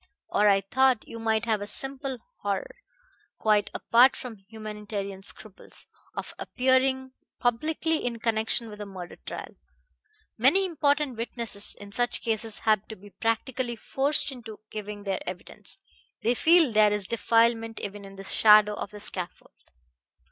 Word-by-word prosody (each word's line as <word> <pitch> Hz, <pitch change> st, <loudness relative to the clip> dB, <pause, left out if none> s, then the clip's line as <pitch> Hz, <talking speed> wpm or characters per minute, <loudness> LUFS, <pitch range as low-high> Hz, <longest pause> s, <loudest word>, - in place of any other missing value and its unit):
Or 210 Hz, 0 st, +4 dB
I 195 Hz, -1 st, +4 dB
thought 255 Hz, +4 st, +2 dB
you 230 Hz, -, -8 dB
might 220 Hz, 0 st, +1 dB
have 220 Hz, -3 st, +1 dB
a 205 Hz, -, -4 dB
simple 270 Hz, +3 st, -3 dB, 0.2 s
horror, -, -, -3 dB, 0.6 s
quite 210 Hz, -2 st, +2 dB
apart 245 Hz, +3 st, +5 dB
from 240 Hz, -4 st, -8 dB
humanitarian 210 Hz, -3 st, -6 dB
scruples, 200 Hz, 0 st, -7 dB, 0.3 s
of -, -, -5 dB
appearing 260 Hz, 0 st, +1 dB, 0.3 s
publicly 310 Hz, +6 st, 0 dB
in 240 Hz, -1 st, -2 dB
connection 225 Hz, 0 st, 0 dB
with 210 Hz, -1 st, -9 dB
a 205 Hz, -, -6 dB
murder 185 Hz, -3 st, -9 dB
trial. -, -, -8 dB, 0.9 s
Many 330 Hz, -, +5 dB
important 290 Hz, -6 st, +1 dB
witnesses 230 Hz, -3 st, -1 dB
in 205 Hz, 0 st, -10 dB
such 245 Hz, +3 st, 0 dB
cases 225 Hz, -1 st, -1 dB
have 215 Hz, -2 st, +2 dB
to 220 Hz, -, -7 dB
be 205 Hz, +1 st, -15 dB
practically 240 Hz, +3 st, -1 dB
forced 275 Hz, +5 st, +1 dB
into 225 Hz, -5 st, -10 dB
giving 210 Hz, -1 st, -6 dB
their 195 Hz, -2 st, -1 dB
evidence. 180 Hz, -, -9 dB, 0.5 s
They 235 Hz, -, +3 dB
feel 325 Hz, +1 st, +5 dB
there 215 Hz, -1 st, +5 dB
is 210 Hz, -2 st, -1 dB
defilement 230 Hz, +1 st, +2 dB
even 205 Hz, 0 st, -6 dB
in 195 Hz, 0 st, -11 dB
the 195 Hz, -, -9 dB
shadow 210 Hz, +1 st, +6 dB
of 205 Hz, -, -5 dB
the 210 Hz, +1 st, -10 dB
scaffold." 180 Hz, -3 st, -6 dB
225 Hz, 150 wpm, -27 LUFS, 210-255 Hz, 0.9 s, shadow